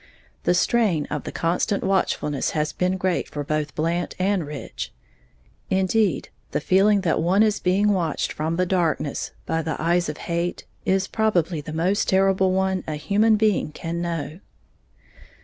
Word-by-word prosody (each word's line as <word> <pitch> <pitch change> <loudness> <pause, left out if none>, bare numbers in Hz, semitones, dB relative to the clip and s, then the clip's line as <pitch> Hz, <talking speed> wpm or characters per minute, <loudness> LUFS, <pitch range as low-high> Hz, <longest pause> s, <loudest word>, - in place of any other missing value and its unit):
The 180 - +3
strain 195 -7 +2
of 150 - -3
the - - -4
constant 175 +4 0
watchfulness 150 -7 0
has 150 0 0
been 185 +1 0
great 185 -1 -1
for 145 - -4
both 150 0 -2
Blant 170 +3 -1
and 190 -1 +1
Rich, 145 -2 -6 0.8
indeed, 190 +1 +1 0.2
the - - -1
feeling 195 +5 +3
that 165 -4 +1
one 185 +6 +4
is 215 -2 +2
being 195 +3 +2
watched 175 -6 0
from 160 +2 -2
the 185 +1 +1
darkness 170 -6 0 0.2
by 165 - 0
the 160 0 -3
eyes 170 0 +1
of 150 - -5
hate 170 +1 -2 0.2
is 190 0 +2
probably 185 -7 +1
the 155 - -8
most 180 +6 +1
terrible 190 0 +3
one 190 -1 0
a 155 - -2
human 210 +8 +3
being 210 -7 +1
can 170 +1 -4
know. 170 -1 -3
180 Hz, 160 wpm, -23 LUFS, 160-195 Hz, 0.8 s, one